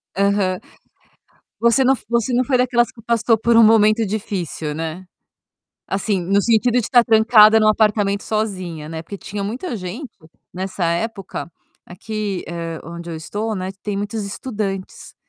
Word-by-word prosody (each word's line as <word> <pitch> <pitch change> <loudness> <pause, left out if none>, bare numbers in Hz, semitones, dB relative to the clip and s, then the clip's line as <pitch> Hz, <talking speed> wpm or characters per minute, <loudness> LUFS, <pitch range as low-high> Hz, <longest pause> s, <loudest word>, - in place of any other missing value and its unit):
Aham. 200 -2 +1 1.0
Você 235 +3 +4
não 265 +1 +5
você 235 +1 0
não 250 +1 +2
foi 260 -1 +1
daquelas 245 -1 +2
que 225 - -16
passou 230 0 +2
por 230 +1 +2
um 230 - +8
momento 220 0 +5
difícil, 185 -7 -4
né. 165 +3 -5 0.8
Assim 195 -1 -1
no 200 +3 +2
sentido 230 +2 +2
de 250 - +4
estar 240 +1 +4
trancada 220 -1 +6
em 215 - +3
um - - +4
apartamento 210 -2 +2
sozinha, 185 -8 -3
né, 160 0 -5
porque 200 +4 -8
tinha 200 +1 -6
muita 245 - -4
gente, 215 - -7 0.4
nessa 185 0 -4
época, 190 +1 -3 0.4
aqui, 205 +1 -4
eh, 165 -1 -5
onde 170 +1 -8
eu 165 - -5
estou 210 +7 -4
né 185 0 -4
tem 205 -1 -3
muitos 205 +1 -3
estudantes. 200 -3 -5
210 Hz, 155 wpm, -20 LUFS, 185-225 Hz, 1.0 s, um